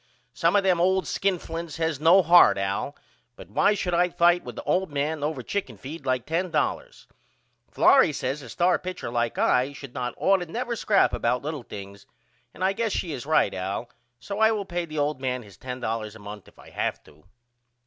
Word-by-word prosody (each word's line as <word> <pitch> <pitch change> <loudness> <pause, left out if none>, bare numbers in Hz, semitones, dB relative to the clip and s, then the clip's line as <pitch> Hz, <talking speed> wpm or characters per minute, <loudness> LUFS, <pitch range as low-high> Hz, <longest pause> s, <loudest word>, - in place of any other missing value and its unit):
Some - - +2
of 200 - +4
them 180 -3 +2
old 190 0 +2
skinflints 170 -3 -2
has 160 -3 -1
no 170 +5 +6
heart 170 - +7
Al 100 +8 -2 0.4
but - - -13
why 210 - +3
should 180 -3 -2
I 175 +1 +3
fight 175 0 +3
with - - -9
a - - -5
old 190 -1 0
man 145 +1 -2
over 145 -4 -2
chicken 135 - -4
feed 140 - -9
like 130 -2 0
$10? 185 - -2 0.6
Florrie 265 - +5
says 135 +1 -3
a 125 - -11
star 180 +8 +2
pitcher 180 -9 -6
like 120 -1 -1
I 130 +3 +2
should 140 -3 -10
not 125 -3 -4
ought 195 0 +3
never 235 +7 -3
to - - -4
scrap 205 -2 +3
about 125 +2 0
little 150 -1 -4
things 100 -3 -10 0.4
and - - -7
I 190 +1 +2
guess 225 0 -1
she 170 - -2
is 135 -2 -6
right 155 -10 +3
Al 100 +6 -4 0.3
so 200 +1 -6
I 220 0 +5
will 210 -2 -2
pay 175 -1 -3
the 155 -1 -8
old 145 -2 -1
man 125 -2 -2
his 100 -3 -15
$10 115 -4 -4
a - - -9
month 105 -1 -10
if - - -20
I - - -15
have - - -3
to. 75 +2 -21
155 Hz, 205 wpm, -25 LUFS, 125-180 Hz, 0.6 s, heart